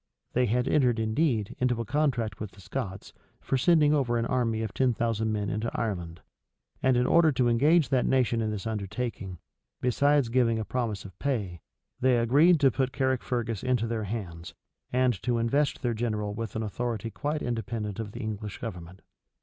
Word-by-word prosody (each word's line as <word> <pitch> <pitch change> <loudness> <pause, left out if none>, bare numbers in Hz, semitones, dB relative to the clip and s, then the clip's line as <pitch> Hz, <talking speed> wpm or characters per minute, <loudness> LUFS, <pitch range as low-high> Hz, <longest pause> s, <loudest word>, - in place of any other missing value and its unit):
They 125 0 +2
had 125 +4 +1
entered, 125 -6 +3
indeed, 110 -1 0
into 125 -2 +1
a 115 - -2
contract 125 -3 0
with 105 -3 -6
the - - -17
Scots, 100 0 -6 0.3
for - - -2
sending 150 +2 +4
over 125 -5 +1
an 115 - 0
army 115 -3 0
of 110 - -4
ten 130 -3 +2
thousand 110 -1 0
men 105 -1 -1
into 110 +4 -2
Ireland; 90 -6 -3 0.6
and 130 -1 +3
in 125 - +2
order 165 +2 +5
to 125 -2 +2
engage 145 +5 +4
that 130 -2 +2
nation 125 -3 +2
in 110 - -1
this 105 -1 -4
undertaking, 105 -2 -4 0.4
besides 140 +1 +2
giving 115 -2 +2
a 110 - -3
promise 110 -6 -3
of 95 -3 -12
pay, 105 - -2 0.4
they 130 -1 +3
agreed 145 +9 +5
to 135 -2 +5
put 130 0 0
Caricfergus 125 -5 -1
into 125 -3 +1
their 115 -2 -2
hands, 90 -6 -6 0.4
and 125 -5 +1
to 120 -2 0
invest 140 +6 0
their 120 -2 +1
general 105 -2 -2
with 115 0 -5
an 110 - -1
authority 115 +1 -3
quite 150 +4 -3
independent 115 -3 -3
of 110 -2 -4
the - - -7
English 105 -1 -5
government. 90 -5 -8
115 Hz, 180 wpm, -28 LUFS, 105-130 Hz, 0.6 s, order